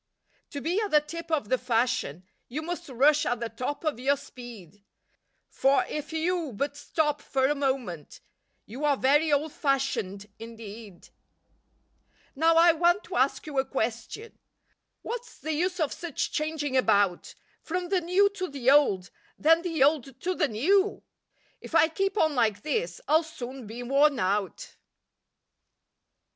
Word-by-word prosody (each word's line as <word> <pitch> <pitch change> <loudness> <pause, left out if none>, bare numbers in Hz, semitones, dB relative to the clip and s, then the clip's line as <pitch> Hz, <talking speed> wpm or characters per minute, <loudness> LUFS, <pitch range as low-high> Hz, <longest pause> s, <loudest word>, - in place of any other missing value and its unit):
To 285 - -6
be 355 +8 0
at 420 - -2
the 300 - +5
tip 335 +3 -8
of 295 -10 -1
the 255 - +2
fashion, 230 - -1 0.2
You 300 +6 -5
must 345 -1 -5
rush 285 +4 +3
at 245 -1 -1
the 235 -1 -3
top 255 +7 -4
of 305 -7 -1
your 280 +3 +2
speed, 215 -8 -12 0.6
For 270 +1 +2
if 300 +1 -5
you 325 -3 -1
but 280 +7 -2
stop 295 0 -1
for 265 -2 0
a 285 - +3
moment, 260 - -3 0.5
You 250 +8 -8
are 290 -2 +3
very 295 +5 +3
"old 290 +1 +1
fashioned" 270 - -1
indeed 225 -4 -10 1.3
Now 325 +3 +3
I 335 +1 +7
want 345 +4 +2
to - - -8
ask - - +1
you 290 -3 -2
a - - +3
question, 265 - -4 0.6
What's 485 +1 -6
the 315 - -4
use 355 +4 -1
of 310 -4 0
such 340 -6 -4
changing 305 -3 -2
about 200 -8 +2 0.3
From 355 +1 -3
the 375 -2 +1
"new 365 +4 +3
to 385 -2 -4
the 270 -4 +1
old," 205 -11 +3 0.3
then 325 +2 +4
the 330 -6 +1
"old 275 -3 +1
to 370 - -1
the 300 - +1
new?" 380 - +1 0.6
If - - -8
I 325 - +6
keep 390 +5 -1
on 315 -5 +3
like 215 -5 +1
this 455 +10 -2
I'll 315 +2 +5
soon 265 -6 -8
be 235 +3 -7
worn 280 +3 +3
out. 195 -2 -2
285 Hz, 155 wpm, -27 LUFS, 245-325 Hz, 1.3 s, I